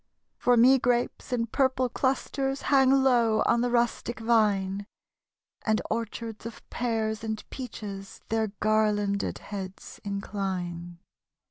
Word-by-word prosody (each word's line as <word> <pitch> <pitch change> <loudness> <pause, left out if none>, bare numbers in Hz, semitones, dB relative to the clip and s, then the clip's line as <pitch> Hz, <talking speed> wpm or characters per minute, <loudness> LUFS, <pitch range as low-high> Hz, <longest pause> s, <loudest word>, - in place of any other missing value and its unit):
For 245 -1 +4
me 260 +3 +7
grapes 245 +1 0
in 235 -2 +1
purple 260 +1 +1
clusters 270 +2 -1
Hang 265 -1 +6
low 245 -5 +4
on 235 - +3
the 245 - +1
rustic 240 -1 0
vine; 205 -4 +1 0.8
And 220 -1 +2
orchards 225 0 -4
of 230 - -11
pears 220 -3 -1
and 220 -1 -4
peaches 205 -6 -7
Their 220 0 +1
garlanded 210 -2 +1
heads 195 -2 -8
incline. 185 -4 -4
225 Hz, 115 wpm, -27 LUFS, 205-245 Hz, 0.8 s, me